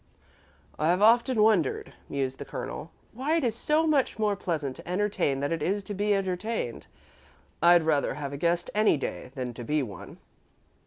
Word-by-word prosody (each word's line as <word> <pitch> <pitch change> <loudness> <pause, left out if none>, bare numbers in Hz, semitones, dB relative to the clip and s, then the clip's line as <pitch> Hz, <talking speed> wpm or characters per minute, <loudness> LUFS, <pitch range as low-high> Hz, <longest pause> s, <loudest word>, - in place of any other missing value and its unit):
"I've 175 +6 +2
often 235 0 +5
wondered," 205 -10 +2 0.2
mused 135 -1 -2
the - - -4
Colonel, 150 +2 -6 0.2
"why 270 +7 0
it 325 - -1
is 235 -3 +1
so 305 +6 +1
much 290 -8 +1
more 210 -2 +1
pleasant 155 -8 -3
to - - -12
entertain 180 -7 0
than 145 - -1
it 165 -2 -1
is 200 +6 0
to 205 - -6
be 205 +1 +1
entertained. 190 - -3 0.7
I'd 170 0 +6
rather 150 -4 +1
have 140 -1 -5
a - - -4
guest 170 +3 0
any 210 -6 +3
day 135 - -5
than 125 -2 -4
to 120 - -8
be 150 +4 0
one." 100 -8 -9
175 Hz, 175 wpm, -27 LUFS, 145-215 Hz, 0.7 s, I'd